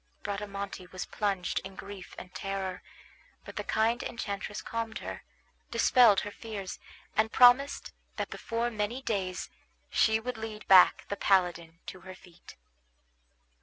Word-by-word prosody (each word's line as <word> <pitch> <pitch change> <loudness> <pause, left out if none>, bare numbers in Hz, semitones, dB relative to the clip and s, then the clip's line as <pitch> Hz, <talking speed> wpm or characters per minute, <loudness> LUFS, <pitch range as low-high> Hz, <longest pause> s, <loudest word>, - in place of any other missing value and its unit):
Bradamante 200 -2 -5
was 185 0 -6
plunged 195 -3 -1
in 190 0 -10
grief 195 -1 -9
and 180 0 -10
terror; 190 -1 -4 0.6
but - - -9
the - - -3
kind 225 +2 +1
enchantress 205 -3 -4
calmed 230 0 -4
her, - - -6 0.5
dispelled 230 -3 +5
her 205 - -5
fears, 205 -4 -7 0.4
and 220 +1 +2
promised 255 +3 +5 0.2
that - - -3
before 235 +1 -2
many 220 +4 -2
days 185 -5 -2 0.4
she 220 0 +4
would 245 +1 -4
lead 220 -1 -7
back 185 -2 +7
the 200 - -2
paladin 175 -4 +1
to 185 - -8
her 185 +1 -10
feet. 180 -1 -16
200 Hz, 135 wpm, -30 LUFS, 185-225 Hz, 0.6 s, back